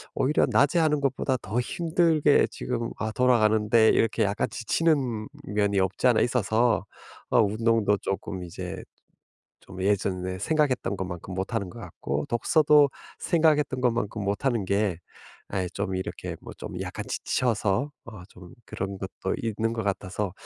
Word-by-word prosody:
오히려 145 +4 +2
낮에 145 +5 +3
하는 150 -3 +2
것보다 135 -1 0
더 105 +5 -2
힘들게 160 +1 +2
지금 120 -2 -3
아 110 0 -2
돌아가는데 110 -2 +4
이렇게 115 0 +2
약간 100 0 0
지치는 125 -2 0 0.2
면이 100 -1 0
없지 95 +6 +1
않아 120 -3 +4
있어서 115 -2 +2 0.4
어 120 - +5
운동도 110 0 +2
쪼끔 95 -1 -4
이제 85 - -6 0.8
좀 95 -1 -11
예전에 95 -2 0
생각했던 130 -7 +1
것만큼 90 -1 -6
못하는 95 +1 -3
것 - - -11
같고 70 +2 -4
독서도 145 +4 +4 0.3
생각했던 150 -5 +2
것만큼 115 -4 0
못 100 +7 -2
하는 120 -6 +1
게 100 -3 0 0.5
아이 95 -2 -2
좀 100 -1 -3
이렇게 95 - -5
뭐 - - -10
좀 - - -6
약간 - - -5
지쳐서 115 +3 0
어 105 -6 -10
좀 90 +3 -14
그런 95 0 -5
것도 95 0 -4
있는 115 0 -1
것 115 -2 -3
같아서 100 0 -2
110 Hz, 300 characters per minute, -26 LUFS, 100-125 Hz, 0.8 s, 어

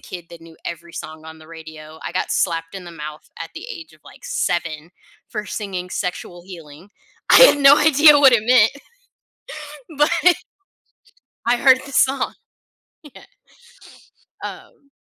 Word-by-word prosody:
kid 175 -2 -10
that 170 - -12
knew 165 -1 -16
every 170 0 -8
song 155 0 -9
on 160 0 -12
the 155 0 -17
radio. 160 -1 -12
I - - -6
got - - -3
slapped 165 0 -2
in 190 - -9
the 175 - -11
mouth 150 -1 -10
at 165 - -8
the 350 +7 -9
age 330 -8 -10
of, - - -22
like, - - -17
7 160 - -3 0.4
for 210 -2 -5
singing 185 -3 -6
"Sexual 180 -2 -5
Healing." 170 -1 -13 0.4
I - - +8
had - - +7
no 280 0 +7
idea 300 0 +6
what 270 -2 +6
it 235 -3 +3
meant 235 -2 +5 1.3
but 315 +4 +3 1.1
I 240 +1 +2
heard 260 0 +5
the 280 - -11
song. 265 +1 +1 0.7
Yeah 295 -5 -15 1.2
um 280 - -11
180 Hz, 150 wpm, -20 LUFS, 165-275 Hz, 1.3 s, I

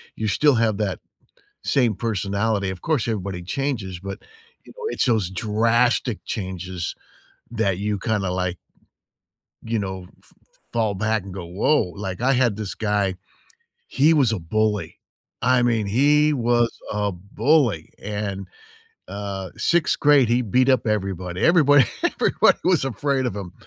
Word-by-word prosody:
you 110 - -2
still 145 +6 +3
have 115 -3 +1
that 105 -3 -2 0.6
same 120 -6 +2
personality. 100 -1 -1
Of 95 -2 -6
course, 150 -8 0
everybody 100 -5 -3
changes, 105 -4 -3
but, 95 +1 -7 0.5
you - - -14
know, 485 - -9
it's - - 0
those 110 -8 +1
drastic 115 +4 +1
changes 95 -3 -4 0.6
that 105 -5 0
you 105 0 -1
kinda 105 -4 -1
like 90 0 -2 1.1
you 115 0 -1
know, 95 -2 -5
f - - -22 0.4
fall 110 -3 +1
back 110 +1 0
and 95 -1 -9
go, 90 -3 -7
"Woah." 95 - +1
Like, 95 -1 -5
I 135 +2 +3
had 125 -5 +2
this 105 -2 -5
guy, 105 -3 0 0.7
he 150 +4 +3
was 135 -7 +3
a 110 - -2
bully. 105 +4 -1 0.4
I 125 0 +3
mean, 115 -4 +1
he 150 +7 +3
was 120 -2 +2 0.2
a 105 -1 -1
bully. 105 - +1
And, 100 -2 -4 0.6
uh, 100 -2 -5
6th 170 -1 +1
grade, 145 -5 +5
he 120 +1 +2
beat 125 +4 +2
up 130 -2 +3
everybody. 95 -4 -2
Everybody 145 -5 +6 0.2
everybody - - +3
was 180 -6 +3
afraid 135 0 -1
of 120 - -2
him. 95 -3 -6
110 Hz, 145 wpm, -23 LUFS, 95-125 Hz, 1.1 s, Everybody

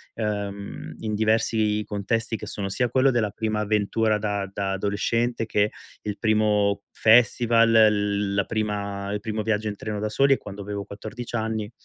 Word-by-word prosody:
uhm, 100 -2 -4
in 110 -1 -3
diversi 110 -1 +1
contesti, 115 +3 -1
che - - -7
sono 100 -1 -4
sia 120 +6 0
quello 130 +2 +3
della 115 -4 +1
prima 110 +1 -2
avventura 105 +1 +1
da 100 -2 -2
da 100 -1 -2
adolescente 115 +4 0
che 105 -1 +1 0.3
il 105 -1 -4
primo 105 -2 +2
festival, 115 0 +4
l 105 -2 +3
la 100 0 +2
prima 100 -2 -3
il 105 - -1
primo 110 0 -3
viaggio 110 0 0
in 105 - -5
treno 105 0 -4
da 105 +1 -2
soli, 135 +6 +4
è - - +1
quando 100 0 -9
avevo 100 0 -4
14 110 +5 -7
anni, 110 -1 -2
105 Hz, 165 wpm, -25 LUFS, 100-115 Hz, 0.3 s, festival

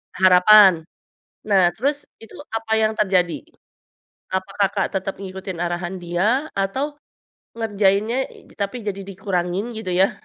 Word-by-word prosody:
harapan. 185 -1 +6 0.6
Nah, 195 -4 +4
terus 285 +4 -1 0.2
itu 225 - -14 0.2
apa 225 0 -2
yang 220 0 +2
terjadi? 185 -4 +1 1.0
Apa 190 0 -2
Kakak 195 0 +2
tetep 195 +1 -5
ngikutin 190 -2 -7
arahan 175 +1 -3
dia 200 - 0
atau 265 +10 -2 0.6
ngerjainnya 210 +1 +1
i - - -17
tapi 205 +4 -4
jadi 200 -1 -3
dikurangin 195 +2 -3
gitu 220 -4 -6
yah? 190 +2 +4
195 Hz, 125 wpm, -21 LUFS, 185-220 Hz, 1.0 s, harapan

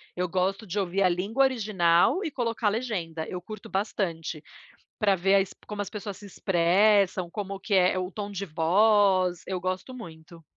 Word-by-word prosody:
eu 180 0 -1
gosto 190 +4 -1
de 200 +2 -3
ouvir 190 +1 0
a 185 - +4
língua 200 +9 +1
original 210 - +2
e 320 - -3
colocar 230 -4 0
legenda, 180 -9 -3
eu 180 - -5
curto 215 +2 -10
bastante, 170 -6 -3 0.6
pra 200 -4 +3
ver 195 +2 +2
as 195 -1 +1
como 210 -1 -4
as 200 - -5
pessoas 205 -2 -6
se 205 - -13
expressam, 190 0 +2
como 195 0 -5
que 200 +1 -1
é 185 0 +4
o 180 0 -3
tom 205 0 -5
de 200 0 -4
voz, 185 +2 +3
eu 185 -1 -3
gosto 185 +7 -3
muito. 165 -6 -12
195 Hz, 175 wpm, -27 LUFS, 180-210 Hz, 0.6 s, a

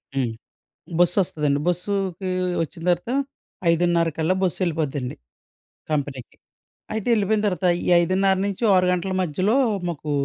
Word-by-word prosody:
హ్మ్. 125 -4 0 0.7
బస్సొస్తదండి. 160 -5 +2
బస్సుకీ 190 +1 -1 0.3
వచ్చిన 165 +1 -7
తర్వాత 175 +7 -1 0.6
5:30 170 0 +2
కల్లా 160 +4 +2
బస్సెళ్ళిపోద్దండి 155 -8 -1 0.7
కంపెనీకి. 140 -4 -3 0.6
అయితే 220 +1 -3
ఎళ్ళిపోయిన 210 0 +1
తర్వాత 180 -2 0 0.2
ఈ - - -5 0.2
5:30 190 +2 +2
నుంచి 200 +3 -4
ఓ - - +5
6 180 0 +3
గంటల 185 +1 -1
మధ్యలో 185 - 0 0.3
మాకు 155 -2 -5
175 Hz, 115 wpm, -23 LUFS, 155-190 Hz, 0.7 s, ఓ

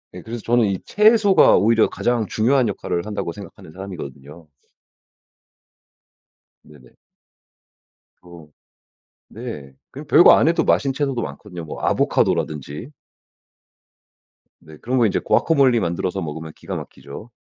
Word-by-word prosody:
예. - - -8
그래서 115 +1 -7
저는 120 -1 +2
이 95 -2 -2
채소가 210 -2 +4
오히려 110 +3 +3
가장 120 -2 -1
중요한 120 +4 +1
역할을 90 -3 -3
한다고 105 -5 -4
생각하는 90 -4 -12
사람이거든요. 80 -4 -10 2.1
네네. 70 -5 -18 1.3
어. 85 -3 -14 0.8
네. 110 - -9 0.2
그냥 - - -10
별거 - - +7
안 - - +3
해도 - - +1
맛있는 105 +11 +1
채소도 135 -4 -2
많거든요 90 -5 -8
뭐 75 - -8
아보카도라든지. 75 - -1 1.7
네. 80 -1 -15
그런 130 +8 -2
거 120 - +4
이제 105 - 0
과카몰리 135 -7 +3
만들어서 90 +1 -3
먹으면 80 0 -7
기가 - - -7
막히죠. 90 +11 -10
100 Hz, 290 characters per minute, -20 LUFS, 80-120 Hz, 2.1 s, 별거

